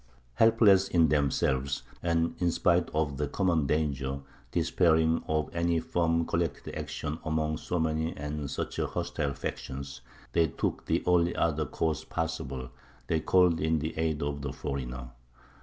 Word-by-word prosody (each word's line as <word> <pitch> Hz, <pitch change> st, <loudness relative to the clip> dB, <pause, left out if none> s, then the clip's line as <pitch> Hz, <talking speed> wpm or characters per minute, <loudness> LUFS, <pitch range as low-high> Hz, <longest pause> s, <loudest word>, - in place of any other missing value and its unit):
Helpless 105 Hz, -, +5 dB
in 85 Hz, -5 st, +4 dB
themselves 70 Hz, -2 st, +1 dB, 0.2 s
and, 85 Hz, -1 st, +1 dB
in 90 Hz, -, +2 dB
spite 85 Hz, +1 st, +2 dB
of 75 Hz, -3 st, -1 dB
the 75 Hz, 0 st, -1 dB
common 85 Hz, -3 st, +1 dB
danger, 70 Hz, -3 st, -1 dB, 0.3 s
despairing 80 Hz, -2 st, +3 dB
of 80 Hz, 0 st, 0 dB
any 85 Hz, 0 st, +1 dB
firm 85 Hz, 0 st, +1 dB
collected 85 Hz, -3 st, -2 dB
action 75 Hz, +1 st, -4 dB
among 80 Hz, -1 st, 0 dB
so 90 Hz, -, -3 dB
many 80 Hz, 0 st, -1 dB
and 75 Hz, -1 st, -4 dB
such -, -, -4 dB
hostile 70 Hz, -1 st, -2 dB
factions, 70 Hz, 0 st, -5 dB, 0.3 s
they 85 Hz, -1 st, +4 dB
took 70 Hz, -, -3 dB
the -, -, +1 dB
only 85 Hz, -1 st, +3 dB
other 80 Hz, -2 st, +1 dB
course 80 Hz, -3 st, -1 dB
possible 75 Hz, -6 st, -4 dB, 0.3 s
they 80 Hz, -, +1 dB
called 90 Hz, 0 st, +4 dB
in 80 Hz, +1 st, +2 dB
the 80 Hz, +2 st, -3 dB
aid 80 Hz, -2 st, 0 dB
of 70 Hz, 0 st, -2 dB
the 70 Hz, -1 st, -3 dB
foreigner. 65 Hz, -3 st, -5 dB
80 Hz, 145 wpm, -29 LUFS, 70-85 Hz, 0.3 s, Helpless